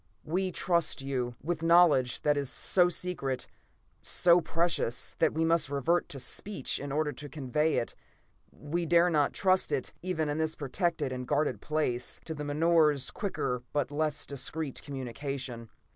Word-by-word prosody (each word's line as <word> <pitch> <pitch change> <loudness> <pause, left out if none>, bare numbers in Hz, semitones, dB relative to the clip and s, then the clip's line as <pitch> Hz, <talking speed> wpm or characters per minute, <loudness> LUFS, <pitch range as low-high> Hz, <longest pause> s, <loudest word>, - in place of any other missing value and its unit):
We 185 +4 -1
trust 170 -5 0
you 125 -3 -2
with 165 +1 -2
knowledge 165 -7 +4
that 150 0 +3
is 140 -2 -2
so 180 +5 +3
secret, 165 -8 -2 0.6
so 175 0 +4
precious, 165 -8 0
that - - +4
we 160 +1 +2
must 165 -3 +2
revert 145 +5 +1
to 140 - -6
speech 190 +3 -2
in 140 0 -5
order 150 +1 0
to 145 +3 -9
convey 150 +3 0
it; 115 - -1 0.6
we 165 +3 -3
dare 170 +2 +4
not 150 -3 +2
trust 185 -1 +2
it, - - -1
even 170 -4 -1
in 150 +1 -2
this 160 0 0
protected 150 0 -1
and 125 -1 -5
guarded 140 -7 0
place, 150 -6 -1
to 160 - -4
the 150 -1 -5
menore's 150 -1 +2
quicker 125 - -2
but 145 -1 0
less 150 0 -1
discreet 140 +2 -4
communication." 130 -3 -5
150 Hz, 160 wpm, -30 LUFS, 135-170 Hz, 0.6 s, knowledge